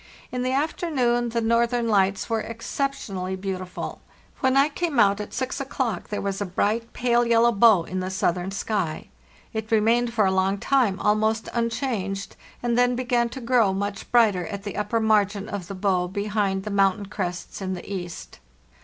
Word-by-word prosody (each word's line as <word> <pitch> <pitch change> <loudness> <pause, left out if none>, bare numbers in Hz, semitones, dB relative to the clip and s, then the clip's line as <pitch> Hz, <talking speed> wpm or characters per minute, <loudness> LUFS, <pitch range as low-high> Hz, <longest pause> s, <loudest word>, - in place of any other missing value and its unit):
In 250 - -2
the 255 +1 0
af 285 +4 0
ternoon 240 -8 0
the 235 0 0
northern 235 +1 +2
lights 195 -2 +2
were 225 -1 0
exceptionally 225 -5 -3
beautiful. 185 -1 -5 0.4
When 260 0 +2
I 275 +1 +6
came 310 -3 -1
out 200 -1 +4
at 210 - -7
6 260 +1 -3
o'clock 255 -7 -3
there 210 - -3
was 195 0 -2
a - - 0
bright, 215 +5 -1
pale 240 -1 +2
yellow 235 0 +4
bow 215 -4 +5
in 185 +2 -4
the 185 0 -3
southern 185 -1 0
sky. 195 -4 -2 0.4
It 220 -1 -4
remained 230 +2 +3
for 220 -3 +2
a 190 - +3
long 190 +1 +1
time 225 -4 +2
almost 215 +1 +1
unchanged, 230 -5 -2 0.3
and 240 -1 +1
then 245 0 +3
began 240 -1 +1
to 255 +2 -8
grow 230 -5 +3
much 200 +1 -4
brighter 210 -7 +4
at 200 -2 -6
the 205 -2 -5
upper 210 +2 0
margin 210 -2 +2
of 200 -5 -5
the 195 - -6
bow 185 -2 +1
behind 200 0 -1
the 210 - -5
mountain 200 +1 +2
crests 185 -2 -5
in 190 -1 -2
the 175 - -9
east. 175 - -6
210 Hz, 180 wpm, -24 LUFS, 195-235 Hz, 0.4 s, I